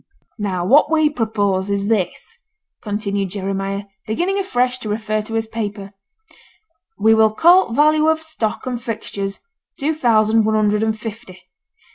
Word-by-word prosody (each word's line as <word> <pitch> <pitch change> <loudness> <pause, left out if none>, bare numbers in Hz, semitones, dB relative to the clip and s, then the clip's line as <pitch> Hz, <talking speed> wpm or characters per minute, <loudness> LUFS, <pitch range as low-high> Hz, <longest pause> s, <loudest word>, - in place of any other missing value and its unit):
'Now 185 -4 -2
what 290 +8 +5
we 310 -2 +3
propose 205 -6 -1
is 200 0 -1
this,' 225 - -2 0.4
continued 205 -2 -2
Jeremiah, 195 +1 -3 0.2
beginning 355 - 0
afresh 250 -9 0
to 220 - -6
refer 215 0 -1
to 225 +2 -6
his 225 0 0
paper: 205 -3 -5 1.0
'We 220 +1 +4
will 220 -1 +3
call 355 +4 +5
t' 230 - -4
value 305 +2 +4
of 320 0 +1
stock 315 -9 -3
and 245 -2 -3
fixtures 200 -4 -4 0.4
two 300 +3 0
thousand 225 -6 +3
one 215 0 +1
hundred 210 0 +2
and 220 0 0
fifty. 205 -5 -9
220 Hz, 150 wpm, -19 LUFS, 205-255 Hz, 1.0 s, what